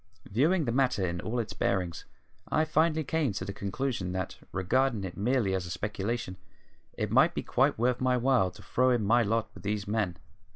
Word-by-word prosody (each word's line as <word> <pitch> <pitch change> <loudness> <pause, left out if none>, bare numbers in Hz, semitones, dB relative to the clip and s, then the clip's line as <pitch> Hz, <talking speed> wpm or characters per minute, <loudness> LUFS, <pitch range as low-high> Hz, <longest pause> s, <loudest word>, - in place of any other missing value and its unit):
Viewing 155 - +2
the 120 - 0
matter 125 -6 +2
in 85 0 -3
all 115 +3 -3
its 115 -3 -2
bearings 90 -4 -1 0.5
I 155 0 +3
finally 160 0 +2
came 150 -5 0
to - - -4
the 100 - -5
conclusion 100 -2 -3
that, 95 -1 -3 0.2
regarding 115 +4 +1
it 95 -2 -5
merely 110 -2 +1
as 90 -2 -2
a - - -8
speculation, 100 +2 -3 0.6
it - - -3
might - - +4
be - - -2
quite - - +2
worth 120 +2 +1
my 130 -1 +3
while 125 -6 +3
to 105 +2 -14
throw 130 +1 +2
in 120 -4 +2
my 120 +4 +4
lot 115 0 0
with - - -12
these 105 0 -2
men. 100 -5 -1
110 Hz, 200 wpm, -29 LUFS, 95-130 Hz, 0.6 s, might